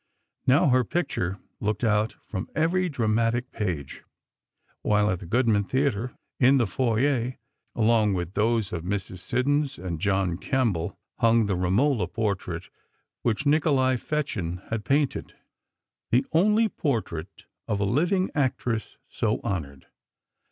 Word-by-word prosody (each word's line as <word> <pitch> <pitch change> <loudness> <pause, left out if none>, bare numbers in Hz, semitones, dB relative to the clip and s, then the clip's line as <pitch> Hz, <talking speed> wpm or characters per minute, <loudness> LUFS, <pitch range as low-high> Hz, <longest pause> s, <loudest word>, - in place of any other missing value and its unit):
Now, 140 +3 +5
her 130 0 +4
picture 100 - -2 0.2
looked 105 +2 -2
out 110 -1 +2
from 95 -3 -5
every 180 +3 +2
dramatic 115 -1 0
page, 85 -11 -4 0.8
while 105 0 +2
at 90 - -2
the 95 - -9
Goodman 110 -1 +2
Theatre, 125 -2 0 0.2
in 135 +2 +6
the 120 - +3
foyer, 125 +3 +1 0.4
along 110 -3 +3
with 90 0 -3
those 110 -2 +1
of 85 -2 -3
Mrs. 95 -1 -3
Siddons 140 +6 0
and 85 -3 -4
John 95 -3 +1
Kemble, 110 - 0 0.2
hung 115 -1 +4
the 100 -2 0
"Romola" 95 - +2
portrait, 105 -4 -3 0.5
which 120 +4 0
Nikolai 145 -3 +3
Fechin 95 - -3
had 110 -2 -2
painted, 140 +2 0 0.7
the 125 +3 +3
only 210 +7 +4
portrait 115 - -3 0.2
of 100 - 0
a 100 - +1
living 175 - +1
actress 125 -6 -1
so - - -1
honored. 70 -8 -4
115 Hz, 130 wpm, -26 LUFS, 100-135 Hz, 0.8 s, in